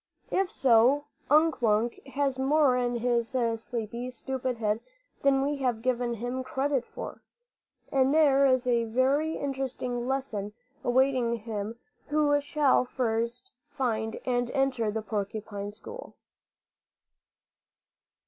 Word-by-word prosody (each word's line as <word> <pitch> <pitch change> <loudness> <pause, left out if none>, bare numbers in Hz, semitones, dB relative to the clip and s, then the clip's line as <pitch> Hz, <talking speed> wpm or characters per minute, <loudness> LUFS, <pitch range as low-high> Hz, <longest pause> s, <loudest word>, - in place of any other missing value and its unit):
If 380 -1 +1
so, 260 +3 +4 0.2
Unk 310 +1 +4
Wunk 225 +1 +1
has 270 -1 -1
more 275 -1 +4
in 245 -1 0
his 235 +1 0 0.2
sleepy, 235 +1 -5
stupid 255 0 -3
head 215 -1 0 0.4
than 270 -1 +3
we 290 +1 0
have 245 -4 -1
given 245 -2 0
him 245 +3 -3
credit 270 0 -1
for, - - -8 0.7
and 265 0 +3
there 280 -3 +5
is 255 -1 +2
a 235 -2 +2
very 270 +7 +1
interesting 260 -3 -3
lesson 230 -7 -2 0.3
awaiting 255 -1 +2
him 220 0 -5 0.3
who 290 -1 +2
shall 290 -3 +3
first 235 -1 -2 0.2
find 225 -6 -2
and 245 -1 0
enter 265 -5 +1
the 215 +1 -3
porcupine 205 -1 -4
school. 465 - -10
250 Hz, 120 wpm, -28 LUFS, 230-275 Hz, 0.7 s, there